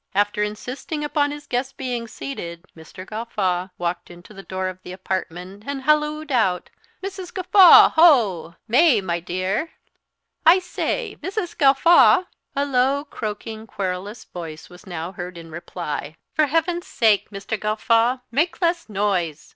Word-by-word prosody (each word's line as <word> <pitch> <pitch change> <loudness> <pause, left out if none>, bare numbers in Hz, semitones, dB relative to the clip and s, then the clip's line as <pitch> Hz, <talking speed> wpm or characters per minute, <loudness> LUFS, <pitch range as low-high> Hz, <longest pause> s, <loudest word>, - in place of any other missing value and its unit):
After 205 +1 +1
insisting 250 +8 -4
upon 290 -1 +1
his 295 0 -8
guests 255 +2 -2
being 245 -3 -4
seated, 175 -8 -7
Mr. 165 +3 -11
Gawffaw 195 -4 -2
walked 175 0 -3
to 175 +4 -14
the 195 - -10
door 190 -1 -4
of 185 0 -7
the 180 - -10
apartment, 185 +1 -5
and 280 -1 -4
hallooed 300 +1 +1
out, 190 -8 +1 0.3
"Mrs. 380 -2 -6
Gawffaw, 370 -1 +7
ho! 220 - +4
May, 255 +1 +5
my 175 -3 -2
dear! 185 - -3 0.7
I 335 +3 +7
say, 360 -1 -3
Mrs. 375 -2 -4
Gawffaw!" 300 +5 +5 0.3
A 280 +1 +1
low, 275 +1 +1
croaking, 220 -3 -6
querulous 200 +2 -4
voice 160 -2 -9
was 180 +3 -15
now 175 -1 -5
heard 180 -1 -7
in 165 -1 -11
reply, 160 -3 -6 0.2
"For 305 0 +2
heaven's 330 +4 -1
sake, 220 -4 +2
Mr. 200 +1 -5
Gawffaw, 230 +4 +1
make 315 +8 0
less 340 -6 0
noise! 190 -7 -1
215 Hz, 145 wpm, -22 LUFS, 185-290 Hz, 0.7 s, Gawffaw